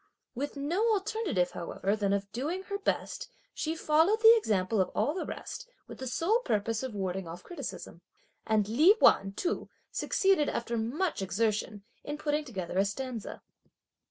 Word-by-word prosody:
With 280 +3 -4
no 360 +11 +1
alternative 395 - 0
however 190 +4 -2
than 205 -2 0
that 200 - +3
of 200 0 -10
doing 310 - -3
her 400 +1 -4
best, 400 - -2 0.2
she 320 +1 -2
followed 325 +7 +3
the 455 +1 +9
example 210 - +1
of 185 - 0
all 295 - +1
the 370 - -4
rest 480 - -7 0.2
with - - -10
the 260 - -4
sole 360 - +2
purpose 220 - -1
of 260 -5 -5
warding 190 -2 -3
off 170 +2 -8
criticism. 350 - -7 0.5
And 215 -2 +2
Li 305 - +6
Wan 195 0 +5
too 350 - -2 0.2
succeeded, 385 -7 +2
after 235 0 -2
much 245 - -1
exertion, 210 +1 -1 0.2
in 295 +1 -4
putting 300 0 0
together 185 -7 -3
a 195 - +4
stanza. 235 +2 -5
255 Hz, 165 wpm, -30 LUFS, -, 0.5 s, the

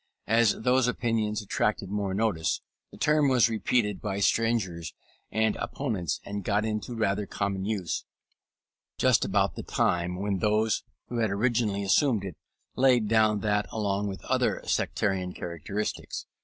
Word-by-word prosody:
As 115 -1 +3
those 125 0 +3
opinions 110 -3 0
attracted 100 -1 -1
more 100 -2 -1
notice, 100 -7 0 0.3
the - - -14
term 150 -2 +3
was 125 -3 +4
repeated 110 -2 0
by 100 -2 -2
strangers 100 -7 0 0.4
and 110 -1 +1
opponents, 105 - -2
and 100 0 -4
got 105 +3 +1
into 110 +2 -3
rather 105 -2 0
common 100 -1 -2
use 100 -5 -2 0.9
just - - +4
about - - +1
the - - -5
time 90 +1 0
when 100 -1 -1
those 105 +1 +2 0.3
who 120 - -3
had 110 -2 +2
originally 105 -1 +1
assumed 110 +2 +3
it, 90 -5 -6 0.4
laid 125 -4 +4
down 110 -1 +3
that 105 -1 +1
along 105 -2 -1
with 95 -1 -6
other - - +1
sectarian 95 -3 0
characteristics. 90 +5 -4
105 Hz, 140 wpm, -28 LUFS, 100-115 Hz, 0.9 s, was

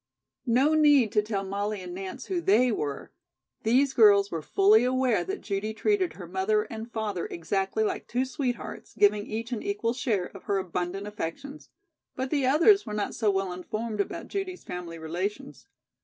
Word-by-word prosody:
No 260 +6 +4
need 290 -7 +5
to 210 - +3
tell 210 -2 -3
Molly 200 +2 -3
and 180 -1 -7
Nance 195 +8 -6
who 360 -2 -2
"they" 245 - +4
were. 145 -9 -4 0.5
These 260 +5 +3
girls 200 -4 +6
were 165 - -3
fully 205 +8 +4
aware 255 -2 +2
that 390 +2 -5
Judy 210 +2 -3
treated 385 - +1
her 180 - -9
mother 190 +4 +1
and 225 +2 -8
father 210 -6 -3
exactly 195 +5 -1
like 215 - -2
two 250 +2 0
sweethearts, 255 -3 -4
giving 205 0 +3
each 230 +3 -4
an 235 - -2
equal 400 - -1
share 225 -7 -1
of 195 - -11
her 200 - +1
abundant 185 +1 -3
affections; 210 - -6 0.5
but 260 0 -3
the 280 -4 +1
others 335 +9 +5
were 210 -2 -5
not 210 - -2
so 220 -3 +1
well 195 -2 0
informed 215 +4 -3
about - - -5
Judy's 385 -2 -4
family 175 -2 -6
relations. 185 - -5
215 Hz, 175 wpm, -27 LUFS, 195-260 Hz, 0.5 s, girls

